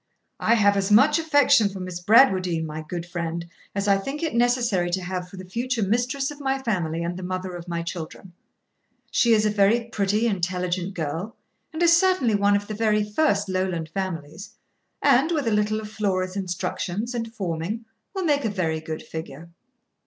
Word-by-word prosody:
'I 230 - +3
have 205 -2 +4
as 195 +1 0
much 285 +9 +6
affection 285 -9 +4
for 195 -1 -8
Miss 185 -1 -5
Bradwardine, 185 -6 +4
my 155 0 -5
good 170 +2 -5
friend, 170 -1 -4 0.3
as 200 0 -1
I 195 -1 +4
think 275 +10 -5
it 320 - -1
necessary 235 -7 +2
to 185 +1 -1
have 180 0 -4
for 190 - -12
the 185 - -8
future 235 +4 -2
mistress 245 +7 0
of 295 - -10
my 270 -1 0
family 170 -10 -1
and 170 +1 -3
the - - -6
mother 185 0 -4
of 175 0 -8
my 170 -1 -3
children. 170 +1 -7 0.8
She 235 - +3
is 215 -1 +3
a 210 - +2
very 210 +3 +3
pretty, 210 +1 0
intelligent 180 -2 -1
girl, 165 +7 -4 0.4
and 320 +2 -2
is 335 0 +6
certainly 340 - +3
of 205 - +2
one 200 0 +4
of 205 0 -1
the 215 - -6
very 215 -1 +2
first 210 -2 +1
Lowland 185 -4 -2
families; 185 +1 -5 0.5
and, 280 +3 +4
with 300 -5 0
a - - +2
little 210 +1 +1
of 215 -1 -8
Flora's 185 -3 -1
instructions 195 +3 -3
and 230 -2 -3
forming, 195 +2 -4 0.3
will 380 - -1
make 290 -3 +2
a 220 - 0
very 165 -6 -1
good 155 0 -6
figure. 160 0 -8
200 Hz, 190 wpm, -24 LUFS, 175-230 Hz, 0.8 s, much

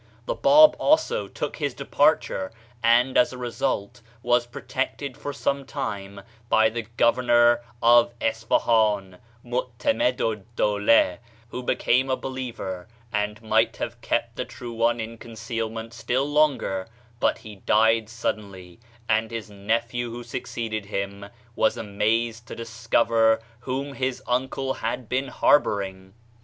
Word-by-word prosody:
The - - -1
Bab 305 - +7
also 305 - +2
took - - -5
his - - -2
departure, 95 0 +1 0.3
and 120 +3 +4
as 125 - +3
a 130 - -8
result 120 -2 -3 0.2
was 120 0 +2
protected 130 +2 -4
for 145 0 -5
some 140 0 -1
time 100 -5 -5 0.3
by 110 0 +5
the 115 -1 -5
governor 120 0 +4 0.2
of 120 0 +6
Isfahan, 110 -4 +1 0.3
Meu'temed 125 - -1
ed 115 -5 0
Dowleh, 105 -3 +3 0.3
who 125 - -5
be 125 - 0
came 130 +2 +2
a 130 - +1
believer, 115 -8 -5 0.3
and 105 +2 -2
might 110 - +2
have - - -5
kept - - -1
the - - -1
True 120 -1 -8
One 115 +1 +1
in 115 +1 -6
concealment 115 0 -5
still 125 +3 -1
longer, 145 -11 +1 0.3
but - - +2
he 105 -2 -11
died 110 +2 +3
suddenly, 100 -5 -5 0.3
and 110 +1 +1
his 115 -2 -6
nephew 115 +4 -2
who 120 +1 -7
succeeded 115 -3 -4
him 100 0 -4 0.3
was 110 - +2
amazed 115 +3 -1
to - - -7
discover 115 0 +2 0.3
w^hom 135 +2 -3
his 130 -1 -2
uncle 130 +2 -1
had 125 -3 -4
been 130 +3 -1
harboring. 95 -8 +1
115 Hz, 135 wpm, -25 LUFS, 105-125 Hz, 0.3 s, Bab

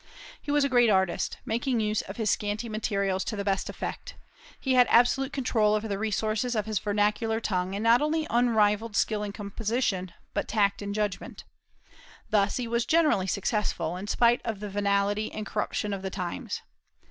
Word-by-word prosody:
He - - -9
was 290 0 +3
a 280 - +1
great 245 -3 +4
artist, 190 -3 +1
making 240 +2 0
use 215 -1 0
of 195 - -9
his 220 -3 +1
scanty 210 +3 -2
materials 200 -4 -1
to 215 - -3
the 200 - -3
best 195 -1 -1
effect; - - -6 0.4
he 265 - 0
had 250 -2 +6
absolute 265 +3 +4
control 225 -6 +2
over 215 +1 -2
the 200 -2 -3
resources 220 +3 -1
of 215 - 0
his 215 -3 -1
vernacular 210 +2 0
tongue, 185 -3 -1
and 205 - -3
not 230 +3 +5
only 310 +1 0
unrivalled 220 -2 +2
skill 215 0 +1
in 205 -1 -3
composition, 205 -2 -2 0.2
but - - -2
tact 200 -2 +1
and 200 0 -4
judgment. 210 -3 -3 0.9
Thus 205 -1 +2
he 245 -2 -3
was 235 +1 0
generally 305 - +3
successful, 190 -4 -1
in 190 +3 -6
spite 235 +3 +3
of 220 -4 -3
the 210 0 -5
venality 200 +1 0
and 215 - -5
corruption 210 -1 -2
of 195 - -4
the 190 - -3
times. 180 -2 -5
215 Hz, 180 wpm, -27 LUFS, 200-235 Hz, 0.9 s, had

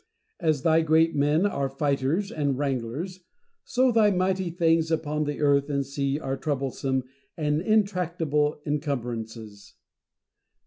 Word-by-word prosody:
As 155 -5 +1
thy 160 0 +4
great 160 +1 +3
men 150 +5 +2
are 140 -9 -1
fighters 140 +7 0
and 140 -4 -1
wranglers, 140 +7 -3 0.4
so 255 0 +2
thy 220 -2 +4
mighty 185 -1 0
things 165 -1 +2
upon 155 -2 -1
the 145 0 -3
earth 140 -1 +3
and 140 -1 0
sea 140 +1 -2
are 135 -3 -3
troublesome 135 -2 -2 0.3
and 150 -1 0
intractable 170 -8 +1
encumbrances. 115 -8 -4
150 Hz, 125 wpm, -26 LUFS, 135-165 Hz, 0.4 s, thy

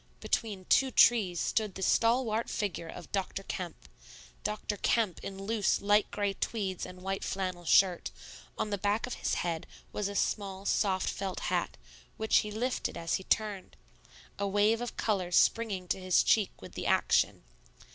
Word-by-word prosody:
Between 200 -5 -2
two 265 +7 +4
trees 210 -8 +4
stood 215 -4 0
the 190 - -4
stalwart 230 +1 +2
figure 195 -5 -3
of 175 - -10
Dr. 195 0 -2
Kemp, 180 - -6 0.6
Dr. 210 0 -2
Kemp 215 -3 +1
in 195 0 -6
loose, 215 0 +1
light 205 +1 +3
gray 205 -1 -1
tweeds 195 -3 -3
and 180 0 -11
white 195 0 -2
flannel 185 -2 -3
shirt; 180 +1 +4 0.5
on 210 - -2
the 200 - -1
back 205 +3 +1
of 250 - -5
his - - -1
head 165 -2 -2 0.3
was 210 - -1
a 200 - -5
small, 195 -2 -1
soft 190 -3 +1
felt 195 -2 -3
hat, - - -1 0.4
which 220 0 +3
he 210 - +1
lifted 240 +5 -2
as 165 -1 -3
she 190 - -9
turned, 210 -3 -1 0.6
a 200 - 0
wave 205 +3 +2
of 245 - -5
color 190 -5 0
springing 195 -1 +2
to - - 0
his 185 -1 +3
cheek 210 -4 +3
with - - -9
the - - -4
action. - - +2
200 Hz, 165 wpm, -31 LUFS, 185-215 Hz, 0.6 s, two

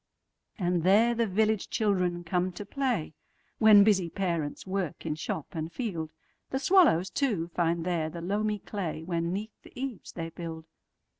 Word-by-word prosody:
And 175 -4 +1
there 210 +7 +5
the 230 -1 +1
village 215 +1 +1
children 180 -5 0
come 180 +2 0
to 205 +4 -7
play, 245 - -1 0.5
When 215 -2 +8
busy 190 -5 +3
parents 170 -5 -2
work 190 -5 -3
in 155 - 0
shop 155 -1 -4
and 160 0 -4
field. 170 -9 -4 0.4
The 265 - -1
swallows, 290 - +4
too, 205 - 0
find 170 -1 0
there 170 -3 0
the 170 - -7
loamy 210 +4 0
clayWhen 170 -4 -3
'neath 200 +5 -4
the - - -16
eaves 260 -6 -5
they 165 -1 -4
build. 165 -1 -7
185 Hz, 155 wpm, -29 LUFS, 165-215 Hz, 0.5 s, When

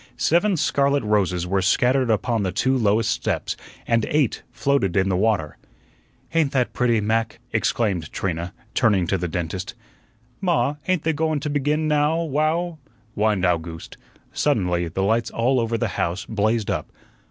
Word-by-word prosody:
Seven 180 +3 +2
scarlet 140 -2 +2
roses 95 -5 +1
were 95 +2 0
scattered 125 +7 +2
upon 115 +1 +1
the 95 -2 -1
two 130 +8 +1
lowest 110 -2 +2
steps, - - -2 0.3
and 115 -1 +2
eight 150 -6 +1
floated 130 -8 0
in 95 0 +2
the 95 - +1
water. 95 -6 0 0.7
"Ain't 160 -4 +2
that 125 -3 +1
pretty, 120 -3 +2
Mac?" 110 +1 0
exclaimed 100 -7 0
Trina, 85 -2 -3 0.2
turning 105 -7 +3
to 95 +3 0
the 90 - -2
dentist. 85 +2 -4 0.7
"Ma, 150 -6 +1
ain't 185 -4 +1
they 160 - +1
go 160 +2 0
wun 155 -2 0
to 150 0 -3
begin 150 +2 0
now 150 +2 +2
wow?" 160 +3 0 0.3
whined 105 -3 +1
Owgooste. 85 -2 -2 0.4
Suddenly 90 - +1
the 95 +4 -2
lights 110 +3 +1
all 125 +3 +1
over 115 0 0
the - - -1
house 90 +3 -2
blazed 110 +1 0
up. - - -3
115 Hz, 160 wpm, -23 LUFS, 95-145 Hz, 0.7 s, turning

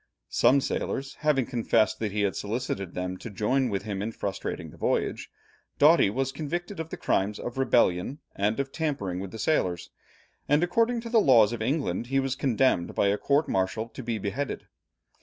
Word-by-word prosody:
Some 140 +1 +4
sailors 135 +1 -3
having 150 -4 +2
confessed 115 -2 +1
that 110 -2 -2
he 105 +1 -1
had 100 -2 0
solicited 100 -4 -3
them 90 0 -3
to 115 - -8
join 125 +6 +1
with 100 -2 -2
him 100 -2 -4
in 110 +3 -2
frustrating 100 -3 -4
the - - -14
voyage, - - -1 0.5
Doughty 150 -6 +6
was 135 +5 -1
convicted 175 +6 -4
of 160 0 -4
the - - -6
crimes 100 +2 0
of 120 +2 -5
rebellion, 120 -2 +2 0.2
and 105 +4 0
of 135 0 -2
tampering 135 - -2
with 95 0 -5
the 110 - -8
sailors, 95 - 0 0.6
and 145 +3 +4
according 230 +6 +1
to 230 - -7
the 230 -2 +5
laws 120 - +5
of 115 - -5
England, 120 - -1
he 135 +1 +1
was 135 -1 -1
condemned 130 -9 +1
by 100 - +3
a 100 - +1
court 145 +2 +2
martial 95 +5 -1
to 125 - -8
be 115 -2 -2
beheaded. 110 +7 -3
120 Hz, 190 wpm, -27 LUFS, 100-140 Hz, 0.6 s, Doughty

